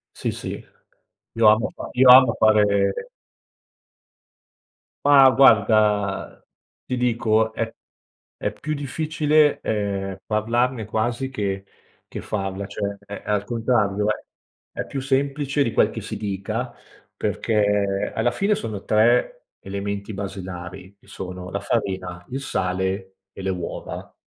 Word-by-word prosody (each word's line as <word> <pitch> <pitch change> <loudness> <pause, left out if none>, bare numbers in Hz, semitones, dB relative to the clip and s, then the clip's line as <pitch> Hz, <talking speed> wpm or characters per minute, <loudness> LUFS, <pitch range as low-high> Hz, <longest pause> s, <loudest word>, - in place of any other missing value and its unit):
Sì, - - -2
sì - - -6 0.7
io 115 -1 +5
amo 110 +2 +4
fa - - -7
io 130 +1 +5
amo 130 -2 +8
fare 100 -2 +3 2.1
Mah 140 -2 +8
guarda, 105 -5 +3 0.4
ti 125 - -2
dico, 110 -2 +1
è 115 0 -2 0.7
è - - -2
più 155 0 -4
difficile, 150 +1 +1
ehm, 100 -2 -2
parlarne 115 +2 0
quasi 120 +4 -1
che 100 -6 -3 0.4
che - - -7
farla. 95 -1 -3
Cioè, 100 0 -4
è 100 0 -7
è - - -9
al 105 -1 +1
contrario 105 -3 0
è 105 - -2 0.6
è - - -1
più 135 - -5
semplice 140 +1 0
di 115 -5 +1
quel - - +4
che - - -6
si - - -6
dica, 110 +4 -4 0.4
perché 105 -3 0
alla 120 +2 +1
fine 200 - +1
sono 110 - -6
3 120 - +2
elementi 100 +1 -5
basilari 95 -1 -7
che - - -26
sono 90 -1 -7
la - - -2
farina, 90 -2 -3
il 130 - -3
sale 95 -3 -2 0.2
e - - -9
le 95 - -2
uova. 90 -2 -5
105 Hz, 130 wpm, -23 LUFS, 100-125 Hz, 2.1 s, amo